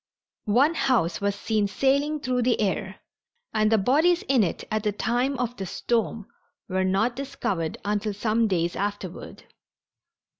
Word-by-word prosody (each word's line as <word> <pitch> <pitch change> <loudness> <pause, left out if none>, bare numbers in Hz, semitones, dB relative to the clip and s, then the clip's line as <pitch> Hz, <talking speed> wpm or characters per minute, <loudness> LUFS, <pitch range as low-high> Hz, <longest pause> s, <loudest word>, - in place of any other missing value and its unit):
One 270 +10 +4
house 235 - +1
was 200 0 0
seen 210 0 0
sailing 280 +7 +1
through 250 -1 0
the 245 0 +2
air, 195 -1 -2 0.5
and 215 0 +2
the 220 - +5
bodies 310 - +3
in 260 -4 +3
it 180 - -2
at 215 0 0
the 210 0 0
time 245 +6 0
of 245 0 -2
the 195 - -4
storm 225 0 -1 0.4
were 190 0 0
not 200 +6 +1
discovered 200 - -3
until 205 0 -1
some 220 +2 +1
days 175 -3 0
afterward. 200 -3 -5
215 Hz, 150 wpm, -25 LUFS, 200-255 Hz, 0.5 s, the